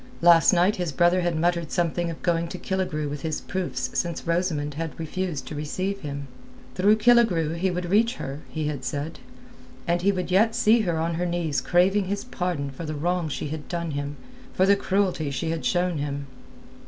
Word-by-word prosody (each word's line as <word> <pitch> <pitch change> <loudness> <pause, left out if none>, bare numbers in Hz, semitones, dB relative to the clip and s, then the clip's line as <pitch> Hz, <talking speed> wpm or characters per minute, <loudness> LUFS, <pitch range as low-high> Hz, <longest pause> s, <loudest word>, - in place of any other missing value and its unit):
Last 170 -3 +7
night 180 +3 +3
his 175 -3 -2
brother 175 +5 +3
had 175 -1 0
muttered 170 -1 0
something 175 0 0
of 165 - -8
going 170 -1 +1
to - - -6
Killigrew 180 -6 -2
with 145 0 -5
his 160 -2 -2
proofs 150 -9 -3
since 170 -1 -2
Rosamund 165 -4 0 0.2
refused 165 -1 -3
to - - -7
receive 185 +7 -3
him. 140 -3 -6 0.5
Through 200 +8 +4
Killigrew 215 -9 +4
he 180 +3 0
would 180 0 -2
reach 230 +4 +3
her, 140 - -5
he 155 -1 -3
had 145 -3 -3
said; 145 +3 -4 0.7
and 170 0 +1
he 200 +3 +4
would 185 -1 -3
yet 220 +5 +4
see 235 -1 +4
her 175 -7 0
on 165 +1 0
her 180 - +1
knees 170 -4 -1
craving 190 +3 +3
his 200 +2 -2
pardon 175 - -3
for 135 +5 -8
the 155 -1 -4
wrong 175 +2 -1
she 145 - -4
had 155 0 -6
done 170 -2 -3
him, 145 0 -3 0.4
for 185 - +4
the 200 +1 +5
cruelty 190 -6 0
she 140 +4 -2
had 165 -1 -3
shown 175 -3 +1
him. 140 0 -3
170 Hz, 195 wpm, -25 LUFS, 150-185 Hz, 0.7 s, Last